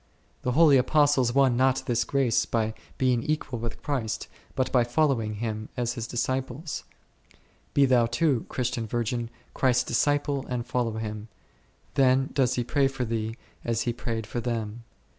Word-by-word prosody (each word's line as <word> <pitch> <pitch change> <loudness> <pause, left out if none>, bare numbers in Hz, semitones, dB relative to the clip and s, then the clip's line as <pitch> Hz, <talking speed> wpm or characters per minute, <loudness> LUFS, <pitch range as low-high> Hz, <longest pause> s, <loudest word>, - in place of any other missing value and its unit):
The 125 - -1
holy 150 -1 +6
Apostles 140 -1 +3
won 135 -1 +4
not 130 +1 +2
this 120 -1 +1
grace 135 -4 +1
by 110 -1 0 0.2
being 125 -2 +2
equal 150 -5 -2
with 115 0 -6
Christ, 130 -7 -2 0.3
but 130 - 0
by 125 -2 +4
following 120 -4 +1
Him 110 0 -4
as 120 -1 0
His 115 -2 -5
disciples; 130 +5 -3 0.9
be 140 - +6
thou 125 -3 +4
too, 125 +1 +1
Christian 120 -2 -2
virgin, 120 +1 -2 0.2
Christ's 125 -2 +2
disciple 145 +2 +1
and 120 -2 -3
follow 120 -3 -1
Him; 110 -1 -5 0.7
then 135 0 +3
does 130 -3 +2
He 120 - 0
pray 140 +3 +2
for 135 -2 -3
thee 110 -1 -2 0.3
as 115 -1 0
He 120 - -1
prayed 115 -2 -4
for 120 - -4
them. 115 -1 -3
125 Hz, 160 wpm, -27 LUFS, 115-135 Hz, 0.9 s, holy